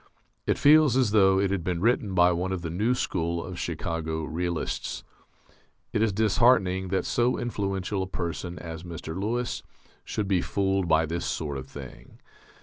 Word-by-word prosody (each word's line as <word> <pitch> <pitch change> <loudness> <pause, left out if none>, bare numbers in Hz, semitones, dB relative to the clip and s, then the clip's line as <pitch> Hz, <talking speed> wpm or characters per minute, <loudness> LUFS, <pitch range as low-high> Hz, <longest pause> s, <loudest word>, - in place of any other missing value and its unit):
It - - +2
feels 150 -3 +6
as 125 -6 +3
though 95 -3 +5
it 100 -1 +1
had 95 -4 -1
been 90 -1 -1
written 110 -2 +1
by 90 0 +5
one 90 +2 -1
of 95 -2 -3
the 85 - -3
new 110 +8 +1
school 85 -6 -1
of 90 -1 -7
Chicago 80 -1 -3
realists. 85 +1 -3 0.9
It 105 - +1
is 110 -1 +3
disheartening 100 -2 +3
that 95 +1 -1
so 120 +1 +1
influential 100 -4 -2
a 95 - -2
person 85 -1 -4
as 80 -2 -7
Mr. 85 -2 -7
Lewis 115 +6 -2 0.4
should 105 -2 -3
be 95 -3 +2
fooled 95 -2 0
by 80 -1 +4
this 85 +2 -3
sort 75 -3 -3
of 65 - -9
thing. - - -11
95 Hz, 170 wpm, -27 LUFS, 85-105 Hz, 0.9 s, feels